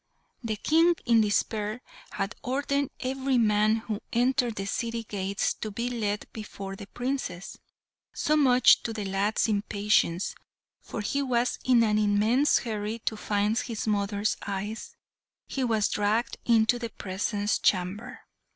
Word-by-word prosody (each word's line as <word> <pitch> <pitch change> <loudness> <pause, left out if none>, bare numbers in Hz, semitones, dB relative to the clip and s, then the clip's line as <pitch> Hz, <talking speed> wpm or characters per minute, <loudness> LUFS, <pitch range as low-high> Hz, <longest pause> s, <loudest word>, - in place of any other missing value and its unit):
The 220 -2 -2
King, 330 - +3
in 230 -2 +5
despair, 210 +1 0 0.3
had 195 +1 -2
ordered 280 +1 -1
every 265 0 0
man 215 -1 +3
who 220 -2 -4
entered 245 -1 +1
the 195 - -4
city 230 +3 -2
gates 200 -2 -2
to 215 - -6
be 235 +4 -3
led 210 -3 -2
before 200 -3 -7
the 195 - -10
Princess; 245 -7 -4 0.5
so, 305 - +1
much 255 -4 +5
to 225 - -4
the 215 -2 -4
lad's 195 +4 +1
impatience, 205 -3 +1 0.5
for 220 - -6
he 280 +7 -1
was 250 -2 0
in 245 -2 +4
an 215 -1 +2
immense 215 +7 +3
hurry 215 -1 -3
to 220 - 0
find 210 +2 0
his 230 -4 -4
mothers' 205 -1 0
eyes, 200 +2 -5 0.5
he 270 - -3
was 220 -4 +2
dragged 215 +3 0
into 230 0 +4
the 235 -1 -4
presence 205 +1 -2
chamber. 205 +7 -1
220 Hz, 140 wpm, -27 LUFS, 205-245 Hz, 0.5 s, in